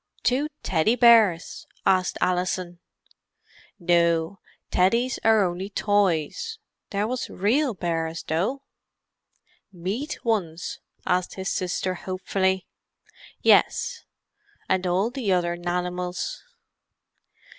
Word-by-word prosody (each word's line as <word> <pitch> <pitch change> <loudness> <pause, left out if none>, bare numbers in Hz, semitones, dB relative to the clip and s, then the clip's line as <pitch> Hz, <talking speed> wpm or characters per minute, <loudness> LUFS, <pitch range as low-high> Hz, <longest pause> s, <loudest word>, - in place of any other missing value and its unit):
"Two 270 +4 +2 0.2
Teddy 185 +6 +2
bears?" 225 -8 +4 0.2
asked 185 -1 +2
Alison. 180 -1 -1 1.0
"No; 170 0 +2 0.3
Teddies 235 +8 +2
are 220 -2 +5
only 185 +2 -2
toys. 205 - 0 0.3
There 205 +1 -1
was 255 +1 -3
real 240 +6 +1
bears, 165 -2 -2
though." 200 - -1 1.1
"Meat 200 - -4
ones?" 180 -7 -1 0.3
asked 180 -1 0
his 190 0 -3
sister 185 0 -1
hopefully. 190 +1 -1 0.8
"Yes. - - +3 0.6
And 185 -1 +1
all 190 +6 +1
the 245 -6 -2
other 175 -1 +1
nanimals." 180 - -3
185 Hz, 90 wpm, -25 LUFS, 175-220 Hz, 1.1 s, are